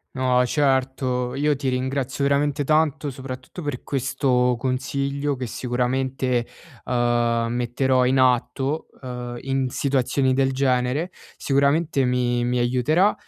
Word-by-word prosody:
No 125 Hz, -1 st, +2 dB
certo, 130 Hz, -2 st, 0 dB
io 145 Hz, 0 st, +1 dB
ti 135 Hz, -1 st, -3 dB
ringrazio 130 Hz, +1 st, -1 dB
veramente 140 Hz, +1 st, +1 dB
tanto, 155 Hz, 0 st, +1 dB
soprattutto 130 Hz, +5 st, -8 dB
per 145 Hz, -5 st, -4 dB
questo 125 Hz, -2 st, +1 dB
consiglio 140 Hz, +2 st, -2 dB
che 130 Hz, -1 st, -4 dB
sicuramente, 125 Hz, 0 st, -1 dB, 0.4 s
uhm, 120 Hz, -1 st, +1 dB
metterò 125 Hz, +2 st, +1 dB
in 130 Hz, +1 st, +2 dB
atto, 130 Hz, +4 st, +1 dB
uhm, 125 Hz, -2 st, -6 dB
in 135 Hz, -1 st, -1 dB
situazioni 135 Hz, 0 st, +1 dB
del 135 Hz, 0 st, +1 dB
genere. 130 Hz, +5 st, 0 dB, 0.2 s
Sicuramente 140 Hz, +1 st, +1 dB
mi 120 Hz, -1 st, +1 dB
mi 125 Hz, 0 st, 0 dB
aiuterà, 130 Hz, -, +2 dB
130 Hz, 120 wpm, -23 LUFS, 125-140 Hz, 0.4 s, No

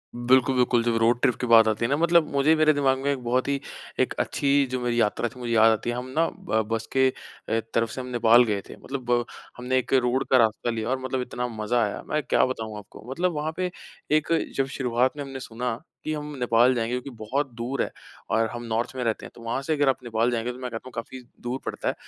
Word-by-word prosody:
बिल्कुल, 130 Hz, +2 st, +3 dB
बिल्कुल, 125 Hz, -1 st, +3 dB
जब 115 Hz, -1 st, +1 dB
रोड 115 Hz, +2 st, +3 dB
ट्रिप 125 Hz, -, +3 dB
की 125 Hz, -, -2 dB
बात 115 Hz, -1 st, +7 dB
आती 110 Hz, +2 st, 0 dB
है -, -, 0 dB
ना 140 Hz, -, +3 dB
मतलब 170 Hz, -1 st, +4 dB
मुझे 140 Hz, +3 st, +4 dB
मेरे 155 Hz, 0 st, +4 dB
दिमाग़ 135 Hz, -2 st, +2 dB
में 140 Hz, +1 st, -1 dB
एक 130 Hz, -3 st, -3 dB
बहुत 125 Hz, +3 st, 0 dB
ही 140 Hz, -1 st, 0 dB, 0.4 s
एक -, -, +2 dB
अच्छी 140 Hz, -1 st, 0 dB, 0.2 s
जो 130 Hz, -, -1 dB
मेरी 120 Hz, -1 st, 0 dB
यात्रा 115 Hz, +2 st, +1 dB
थी 125 Hz, -, -15 dB
मुझे 120 Hz, -1 st, -4 dB
याद 110 Hz, 0 st, +6 dB
आती 110 Hz, +2 st, -1 dB
है, 120 Hz, -, -1 dB
हम 125 Hz, +1 st, -4 dB
ना 165 Hz, -, +4 dB
ब 175 Hz, -, -1 dB
बस 115 Hz, 0 st, -1 dB
के 130 Hz, 0 st, +5 dB
अ, 115 Hz, -3 st, -5 dB
तरफ 115 Hz, -1 st, +1 dB
से 130 Hz, -, -6 dB
हम 125 Hz, -, -8 dB
नेपाल 120 Hz, -1 st, +5 dB
गए 105 Hz, -4 st, -1 dB
थे। -, -, -9 dB
मतलब 120 Hz, -3 st, -1 dB, 0.3 s
हमने 125 Hz, +1 st, 0 dB
एक 130 Hz, -, -1 dB
रोड 130 Hz, 0 st, +2 dB
का 130 Hz, -, +7 dB
रास्ता 115 Hz, 0 st, +2 dB
लिया 115 Hz, 0 st, -2 dB
और 130 Hz, 0 st, 0 dB
मतलब 130 Hz, 0 st, -2 dB
इतना 125 Hz, 0 st, -3 dB
मज़ा 115 Hz, +1 st, 0 dB
आया, 105 Hz, -, -3 dB
मैं 150 Hz, -, +1 dB
क्या -, -, +3 dB
बताऊँ 110 Hz, -4 st, -4 dB
आपको, 105 Hz, -, -12 dB
मतलब 175 Hz, +6 st, 0 dB
वहाँ 155 Hz, +2 st, -2 dB
पे 185 Hz, -1 st, -1 dB, 0.5 s
एक 155 Hz, -, -2 dB, 0.3 s
जब 135 Hz, -, +2 dB
शुरुआत 125 Hz, +2 st, +1 dB
में 145 Hz, -, -3 dB
हमने 135 Hz, -1 st, -7 dB
सुना 120 Hz, -1 st, -3 dB, 0.3 s
कि 155 Hz, -, -2 dB
हम 150 Hz, -1 st, -5 dB
नेपाल 120 Hz, +1 st, +4 dB
जाएँगे, 115 Hz, 0 st, -1 dB
जो 125 Hz, -, -2 dB
कि 140 Hz, -, -8 dB
बहुत 130 Hz, +4 st, -2 dB
दूर 120 Hz, +4 st, -2 dB
है -, -, -5 dB, 0.4 s
और 115 Hz, 0 st, +2 dB
हम 120 Hz, +1 st, -6 dB
नॉर्थ 115 Hz, +1 st, -1 dB
में 130 Hz, -, -2 dB
रहते 115 Hz, -2 st, -1 dB
हैं -, -, -10 dB
तो -, -, -13 dB
वहाँ 115 Hz, +3 st, -2 dB
से 155 Hz, +3 st, -1 dB
अगर 145 Hz, -2 st, +2 dB
आप 130 Hz, -, -1 dB
नेपाल 115 Hz, 0 st, 0 dB
जाएँगे 120 Hz, +1 st, -1 dB
तो 125 Hz, -, -10 dB
मैं 125 Hz, -1 st, -4 dB
कहता 115 Hz, +2 st, -7 dB
हूँ -, -, -10 dB
काफ़ी 130 Hz, +3 st, -6 dB, 0.2 s
दूर 125 Hz, +2 st, -3 dB
पड़ता -, -, -4 dB
है। -, -, -1 dB
125 Hz, 260 wpm, -25 LUFS, 115-135 Hz, 0.5 s, बात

